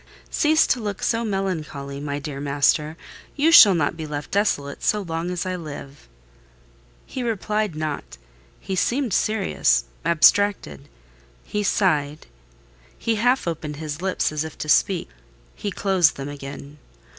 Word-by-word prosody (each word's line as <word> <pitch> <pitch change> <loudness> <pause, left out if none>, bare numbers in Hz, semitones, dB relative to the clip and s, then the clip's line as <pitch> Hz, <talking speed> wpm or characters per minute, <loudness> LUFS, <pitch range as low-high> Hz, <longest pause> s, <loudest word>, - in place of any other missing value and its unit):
Cease 310 0 +3
to 255 - +1
look 205 -3 -5
so 230 0 +1
melancholy, 160 -9 -3
my 145 0 -3
dear 145 -1 -6
master; 145 +2 +1 0.4
you 300 +3 +3
shall 205 - +9
not 155 -1 0
be 160 -1 -6
left 145 -1 -6
desolate, 170 -9 0
so 210 - +1
long 165 0 -3
as 180 0 -3
I 185 0 -2
live." 145 - -9 1.0
He 260 - -6
replied 215 -4 -1
not: 155 - -5 0.4
he 190 - -4
seemed 240 +3 0
serious—abstracted; 170 - +2 0.5
he 210 - -3
sighed; 155 -8 0 0.7
he 230 - -1
half 245 0 +2
opened 155 -3 -4
his 150 +1 -6
lips 190 -4 0
as 155 0 -2
if 160 - -8
to - - -5
speak: 180 +2 +2 0.4
he 205 - -4
closed 190 -4 +2
them 140 +1 -6
again. 145 +1 -9
165 Hz, 140 wpm, -23 LUFS, 145-205 Hz, 1.0 s, shall